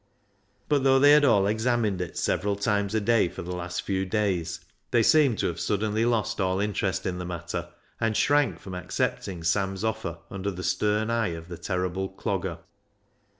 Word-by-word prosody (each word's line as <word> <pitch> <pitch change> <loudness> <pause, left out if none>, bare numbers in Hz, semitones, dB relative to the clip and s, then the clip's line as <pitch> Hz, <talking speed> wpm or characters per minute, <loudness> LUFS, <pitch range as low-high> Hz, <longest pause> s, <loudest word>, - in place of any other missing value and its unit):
But, 145 -2 +2
though 135 -1 +5
they 145 +2 +7
had 150 0 +7
all 105 -8 +4
examined 110 -2 +1
it 90 - -5
several 100 +1 0
times 100 0 0
a - - +3
day 115 -1 +3
for 90 - -7
the 90 +1 -5
last 90 0 -4
few 95 -1 -1
days, 95 -4 -1 0.3
they 115 -1 +3
seemed 140 -4 +4
to - - -1
have 85 -1 -2
suddenly 110 +2 0
lost 115 -4 0
all 95 0 +1
interest 100 -2 -1
in 90 -1 -2
the - - -4
matter, 85 0 -5 0.3
and 115 -2 +1
shrank 145 - +3
from 95 +2 -9
accepting 90 -1 -3
Sam's 95 +3 0
offer 110 -6 -2
under 95 +1 -3
the 90 -2 -6
stern 105 +5 +1
eye 115 -8 0
of 80 +1 -10
the 85 - -6
terrible 90 +1 -2
Clogger. 95 - -3
100 Hz, 185 wpm, -26 LUFS, 90-110 Hz, 0.3 s, they